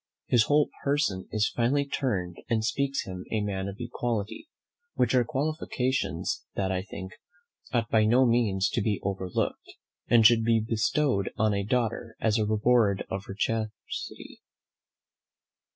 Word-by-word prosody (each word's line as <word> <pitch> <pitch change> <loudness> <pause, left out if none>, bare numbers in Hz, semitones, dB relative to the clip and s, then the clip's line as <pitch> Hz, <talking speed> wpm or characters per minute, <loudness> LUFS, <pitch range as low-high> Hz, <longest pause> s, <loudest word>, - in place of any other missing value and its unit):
His 120 -2 +4
whole 145 0 +3
person 140 -10 0
is 110 0 +2
finely 135 +4 +2
turned, 95 -11 -2
and 110 -1 +1
speaks 140 +3 0
him 90 -1 -6
a 110 - +1
man 100 -2 -2
of 100 0 -6
quality; 120 - -3 0.5
which - - +2
are 125 -1 +4
qualifications 130 - -1
that, 95 -1 0
I 95 -1 0
think, 95 -1 -8 0.6
ought 115 -2 +1
by 110 -1 +4
no 125 +4 +5
means 110 -5 +2
to 120 - -1
be 105 -1 0
overlooked, 95 -2 -3 0.3
and 115 -2 +5
should 115 0 +6
be 115 0 +3
bestowed 115 0 +1
on 110 -1 +2
a 100 - 0
daughter 115 0 -1
as 110 -1 +2
the 110 -1 +1
reward 110 -2 +2
of 95 +1 -3
her 95 - -7
chastity." 110 -1 -4
110 Hz, 150 wpm, -28 LUFS, 100-125 Hz, 0.6 s, should